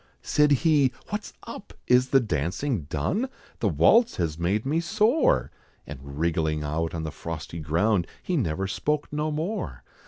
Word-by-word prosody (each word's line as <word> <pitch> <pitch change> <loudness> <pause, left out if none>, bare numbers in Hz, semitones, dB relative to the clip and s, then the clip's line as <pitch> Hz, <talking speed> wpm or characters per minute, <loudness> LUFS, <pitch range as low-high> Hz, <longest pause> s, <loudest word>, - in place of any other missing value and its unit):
Said 150 0 +3 0.2
he, 145 -5 +4 0.2
"What's 210 +1 -4
up? 230 -3 -9
is 125 +1 +4
the 135 - +5
dancing 95 - -1
done? 85 - -1 0.3
The - - +1
waltz 235 +1 +4
has 80 -3 -2
made 100 +6 0
me 150 +4 +1
sore!" 215 - +2 0.3
And 75 -2 -8 0.2
wriggling 80 -1 0
out 80 +3 -2
on 80 - -3
the 80 - -4
frosty 85 +1 -6
ground, 85 +5 +1 0.2
He 180 - -1
never 95 - 0
spoke 145 +10 -2
no 150 +1 0
more! 160 +8 -3
110 Hz, 155 wpm, -26 LUFS, -, 0.3 s, the